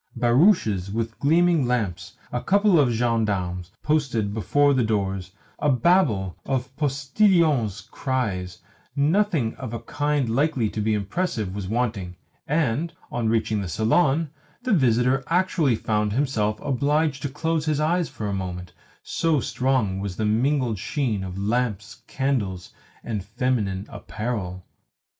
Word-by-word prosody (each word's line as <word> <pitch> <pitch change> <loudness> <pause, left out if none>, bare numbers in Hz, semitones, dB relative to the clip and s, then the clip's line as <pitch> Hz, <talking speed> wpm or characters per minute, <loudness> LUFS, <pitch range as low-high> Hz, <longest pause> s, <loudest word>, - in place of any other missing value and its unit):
Barouches 120 - +3
with 115 +1 -3
gleaming 165 -1 +3
lamps, 100 -7 -2
a 125 - -2
couple 200 -3 +4
of 140 -4 +4
gendarmes 105 -7 -1
posted 125 -9 0
before 145 +6 +2
the 130 -2 +2
doors, 95 -4 -1 0.3
a 150 - +2
babel 120 - +2
of 130 -1 -3
postillions' 145 - +2
cries 105 -6 -3 0.3
nothing 155 - +2
of 120 -3 -5
a - - -4
kind 145 -3 -1
likely 130 -1 +1
to 110 - -3
be 110 +1 +1
impressive 105 - -2
was 100 -2 -5
wanting; 105 -5 -2 0.3
and, 150 +1 0 0.2
on 115 -2 0
reaching 110 -2 +1
the 95 - -4
salon, 135 - +2 0.3
the 250 -3 +1
visitor 130 - +3
actually 170 -7 +2
found 105 -1 -1
himself 110 -5 0
obliged 145 +2 +1
to 145 - -2
close 160 +2 -1
his 150 -2 +1
eyes 165 +2 +1
for 105 - -5
a 100 - -2
moment, 90 -2 -5 0.3
so 165 -3 +1
strong 125 -7 0
was 100 -2 -4
the 110 - -1
mingled 120 0 +1
sheen 115 -5 -1
of 95 0 -6
lamps, 110 0 -2
candles, 110 -10 -2 0.3
and 105 -5 -3
feminine 105 -3 -1
apparel. 100 -6 -5
120 Hz, 135 wpm, -24 LUFS, 105-145 Hz, 0.3 s, couple